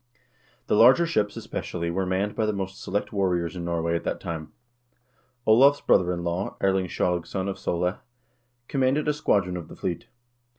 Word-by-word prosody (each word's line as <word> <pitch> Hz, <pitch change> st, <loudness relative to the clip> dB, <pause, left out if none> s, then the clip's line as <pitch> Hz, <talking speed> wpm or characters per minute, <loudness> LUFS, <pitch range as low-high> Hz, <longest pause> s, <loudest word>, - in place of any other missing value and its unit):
The -, -, -1 dB
larger 125 Hz, +10 st, +6 dB
ships, 105 Hz, -11 st, 0 dB
especially, 85 Hz, -1 st, -4 dB
were 95 Hz, +2 st, -1 dB
manned 100 Hz, +3 st, -1 dB
by 110 Hz, 0 st, 0 dB
the 105 Hz, -, 0 dB
most 95 Hz, -1 st, -5 dB
select 105 Hz, +2 st, -3 dB
warriors 90 Hz, -3 st, 0 dB
in 90 Hz, -, -5 dB
Norway 85 Hz, -1 st, -1 dB
at 85 Hz, -, -2 dB
that -, -, -2 dB
time. 80 Hz, -2 st, -6 dB, 0.9 s
Olav's 135 Hz, +6 st, +6 dB
brother 90 Hz, -1 st, +3 dB
in 85 Hz, -1 st, -3 dB
law, 85 Hz, +3 st, -3 dB
Erling 95 Hz, -1 st, +1 dB
Skjalgsson 90 Hz, +2 st, -1 dB
of 100 Hz, -, -4 dB
Sole, 90 Hz, +2 st, -1 dB, 0.7 s
commanded 135 Hz, +2 st, +1 dB
a 150 Hz, -, +3 dB
squadron 100 Hz, -11 st, +1 dB
of 85 Hz, -3 st, -6 dB
the -, -, -11 dB
fleet. 85 Hz, -3 st, -4 dB
95 Hz, 170 wpm, -25 LUFS, 85-105 Hz, 0.9 s, larger